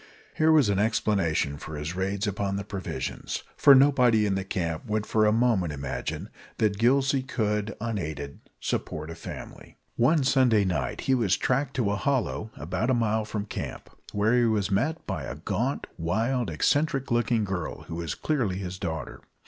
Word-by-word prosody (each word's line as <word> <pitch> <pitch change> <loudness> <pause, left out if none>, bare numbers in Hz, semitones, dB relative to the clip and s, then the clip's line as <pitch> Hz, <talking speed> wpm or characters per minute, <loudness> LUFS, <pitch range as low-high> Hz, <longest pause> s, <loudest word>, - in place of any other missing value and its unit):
Here 160 0 +4
was 150 -7 +5
an 100 -1 +1
explanation 100 -8 +1
of 70 - -9
his 75 +2 -5
raids 95 +2 -1
upon 100 -1 -1
the 100 - -2
provisions, 100 -2 -4
for 140 - +8
nobody 125 -5 +5
in 100 - +1
the 95 0 -1
camp 85 -4 -3
would 105 0 -1
for 110 0 +3
a - - +4
moment 110 -8 +2
imagine 70 -2 -4 0.3
that 105 -2 +1
Gillsey 135 +3 +3
could, 105 -4 -1
unaided, 80 -11 -4 0.2
support 75 +1 -3
a - - -7
family. 80 - -9 0.2
One 140 +5 +4
Sunday 125 -6 +4
night 75 -9 -2
he 135 - +1
was 110 -7 +2
tracked 135 +1 0
to 115 -6 +1
a 105 - 0
hollow 120 -2 -1
about 95 +9 -2
a 130 - +4
mile 110 -2 +1
from 105 -1 -4
camp, - - -6 0.2
where 105 +3 +2
he 120 -1 +4
was 105 -3 +1
met 155 +12 0
by 80 -9 -3
a - - -5
gaunt, - - -2
wild, 110 +7 0
eccentric 135 - +1
looking 120 -1 +2
girl, 95 -4 -4
who 85 - -7
was 85 -4 -3
clearly 120 -12 -1
his 95 -1 -5
daughter. 80 -2 -4
105 Hz, 175 wpm, -27 LUFS, 90-120 Hz, 0.3 s, for